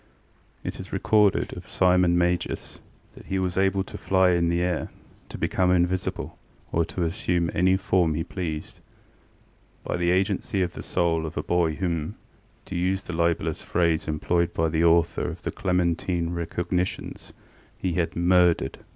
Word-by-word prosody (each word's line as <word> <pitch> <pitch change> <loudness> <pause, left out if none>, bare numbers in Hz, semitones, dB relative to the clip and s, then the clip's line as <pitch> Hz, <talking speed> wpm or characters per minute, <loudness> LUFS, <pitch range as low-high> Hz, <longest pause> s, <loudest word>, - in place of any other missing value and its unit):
ŌĆ£It - - -4
is - - -8
recorded 105 -3 +2
of - - -10
Simon 90 -1 +3
Magus 90 0 -1 0.3
that - - -14
he 95 - -1
was 90 -1 -1
able 95 0 +2
to - - -9
fly 95 -1 +3
in 85 -1 +2
the 85 0 +1
air, 90 -2 -1 0.4
to - - -7
become 90 -1 +1
invisible, 90 +1 0 0.3
or 85 - +2
to 85 +2 -3
assume 85 -1 0
any 95 +2 +3
form 90 -4 +1
he 80 - -1
pleased, 80 -5 -5 1.0
by - - -2
the 85 0 +1
agency 95 +1 +1
of 90 -1 -3
the - - -7
soul 85 -2 0
of 80 - -8
a - - -1
boy 85 -3 +1
whom, 85 -4 -2 0.5
to - - -7
use 95 +2 0
the 90 - -6
libellous 85 -1 0
phrase 85 -2 0
employed 85 +2 0
by 80 0 +1
the 80 +1 +1
author 85 -1 +3
of - - -9
the - - -2
Clementine 90 -2 0
Recognitions, 90 +1 -3 0.5
he 90 -2 -2
had 85 -2 0
ŌĆśmurderedŌĆÖ. 90 0 +3
90 Hz, 160 wpm, -25 LUFS, 85-90 Hz, 1.0 s, Simon